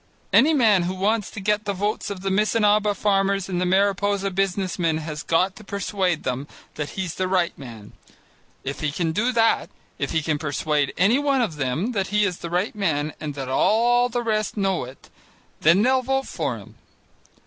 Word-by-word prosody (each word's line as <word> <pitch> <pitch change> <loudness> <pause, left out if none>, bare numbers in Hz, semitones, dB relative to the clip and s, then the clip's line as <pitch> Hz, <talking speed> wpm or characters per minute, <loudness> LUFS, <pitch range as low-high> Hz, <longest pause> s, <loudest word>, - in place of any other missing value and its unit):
Any 315 +3 +5
man 220 -8 +4
who 185 - -3
wants 205 +3 0
to - - -8
get 210 +2 0
the 200 - -1
votes 205 +3 -2
of 195 -2 -6
the 195 0 -1
Missinaba 210 0 +2
farmers 195 -2 +1
and 180 -2 -2
the 180 - +1
Mariposa 200 +1 +1
business 190 -1 -1
men 165 -2 +1
has 155 -1 -5
got 185 +3 +1
to 215 - -12
persuade 195 -4 -1
them 130 +2 -3 0.3
that 150 -1 -5
he's 185 -3 -2
the 185 - -2
right 185 -2 +1
man. 115 -6 -11 0.7
If 140 +1 -5
he 155 -2 -1
can 165 +2 -1
do 225 +9 +1
that, 225 -1 +2 0.3
if - - -1
he 160 -2 0
can 150 -1 -1
persuade 150 -1 0
any 220 +8 +4
one 280 -2 +1
of 175 -10 -2
them 150 - -1
that 195 -5 -1
he 210 +1 +2
is 180 -3 -2
the 170 - -6
right 180 +5 -1
man 155 -8 -1
and 150 -2 -5
that 135 -2 -5
all 240 - +3
the 240 0 -2
rest 215 -2 -1
know 195 -8 0
it, 130 +2 -14 0.5
then 170 +6 +4
they'll 260 +2 +3
vote 270 +1 -1
for 140 -8 -3
him. 105 +1 -13
195 Hz, 200 wpm, -23 LUFS, 160-210 Hz, 0.7 s, Any